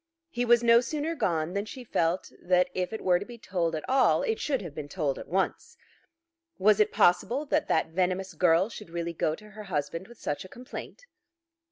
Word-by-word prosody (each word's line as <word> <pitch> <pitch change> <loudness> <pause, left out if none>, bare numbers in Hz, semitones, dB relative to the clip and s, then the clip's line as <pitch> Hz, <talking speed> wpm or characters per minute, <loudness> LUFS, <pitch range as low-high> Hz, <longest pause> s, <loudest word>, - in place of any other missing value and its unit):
He 245 0 -1
was 240 0 +5
no 235 0 +6
sooner 305 +5 -2
gone 170 - -1
than 200 +1 -1
she 255 +3 -8
felt 170 -5 0
that 180 0 +2
if 180 -1 -2
it 220 - -5
were 180 -1 +4
to - - -5
be 240 -1 -10
told 175 -6 -1
at 155 - -5
all 265 - +3
it 450 -3 -1
should 270 -7 -1
have 170 -5 -7
been 145 -1 -7
told 145 -5 -1
at - - -9
once. 190 +2 -2 0.8
Was 205 +1 +4
it 210 - +4
possible 235 +11 +3
that 300 +1 0
that - - +1
venomous 185 +2 -1
girl 170 +2 +3
should 210 -5 -10
really 170 0 -3
go 155 -1 0
to 210 +3 -15
her 215 0 -9
husband 165 0 -3
with 240 0 -15
such 145 - -3
a 185 - -12
complaint? 255 - -9
190 Hz, 210 wpm, -28 LUFS, 170-235 Hz, 0.8 s, no